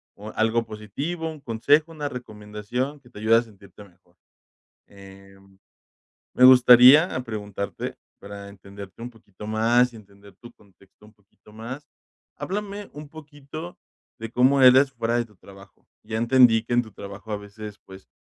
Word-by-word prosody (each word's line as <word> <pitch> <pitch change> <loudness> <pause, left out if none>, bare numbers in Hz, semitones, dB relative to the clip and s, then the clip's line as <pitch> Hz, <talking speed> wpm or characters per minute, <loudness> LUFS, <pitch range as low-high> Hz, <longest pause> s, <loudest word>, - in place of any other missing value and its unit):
o 105 +2 -10
algo 115 +1 +1
positivo, 140 - -5
un 155 - -12
consejo, 145 +7 +1
una 150 -2 -5
recomendación, 120 +4 -6
que 120 - -20
te 105 - -13
ayude 110 +1 +3
a - - +3
sentirte 105 -3 -16
mejor. 90 -2 -25 0.7
Em, 95 0 -17 0.8
me 125 - +2
gustaría 130 +5 +7
preguntarte, 105 -3 -6 0.2
para 100 0 -10
entenderte 100 +1 -13
un 120 - -6
poquito 105 -3 -13
más 115 +3 +2
y - - -13
entender 100 -2 -17
tu 120 - -13
contexto 100 0 -25
un 105 - -19
poquito 100 0 -24
más. 130 +6 -9 0.5
Háblame 205 +1 -5
un 150 0 -10
poquito 155 +2 -10 0.4
de 115 0 -6
cómo 130 +3 +3
eres, 130 +2 +6
fuera 120 -2 -2
de 120 - -1
tu 105 -2 -24
trabajo. 100 0 -18 0.2
Ya 110 +1 -5
entendí 120 -1 +4
que 120 - -5
en 120 - +3
tu 110 - -14
trabajo 100 +2 -10
a 105 - -2
veces, 105 0 -11
pues, 95 0 -14
115 Hz, 160 wpm, -24 LUFS, 100-130 Hz, 0.8 s, gustaría